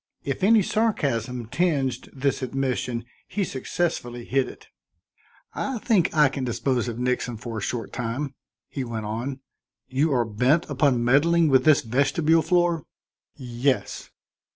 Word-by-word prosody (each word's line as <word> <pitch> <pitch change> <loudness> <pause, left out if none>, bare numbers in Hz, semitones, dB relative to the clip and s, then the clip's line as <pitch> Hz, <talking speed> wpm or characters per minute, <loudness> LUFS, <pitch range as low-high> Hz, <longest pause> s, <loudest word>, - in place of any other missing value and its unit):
If 140 +6 -3
any 215 +1 +5
sarcasm 125 - 0
tinged 135 -2 -1
this 140 0 -1
admission, 125 -3 -2 0.2
he 205 - -1
successfully 130 -6 -3
hid 135 0 +1
it. - - -14 0.9
"I 265 -2 -2
think 215 -6 +2
I 150 -3 +5
can 135 0 -4
dispose 125 +1 -1
of 115 -1 -4
Nixon 125 -1 -1
for 115 0 -5
a - - -7
short 115 +3 -4
time," 125 +4 -3 0.3
he 135 - -4
went 115 -3 -4
on. 120 +6 -4 0.5
"You 140 +5 +1
are 120 -2 +2
bent 125 +10 +2
upon 135 -3 +2
meddling 160 +6 +4
with 130 -1 +4
that 155 -2 +5
vestibule 145 +7 +2
floor?" 170 -1 +2 0.5
"Yes." 125 +1 -2
135 Hz, 140 wpm, -25 LUFS, 120-155 Hz, 0.9 s, any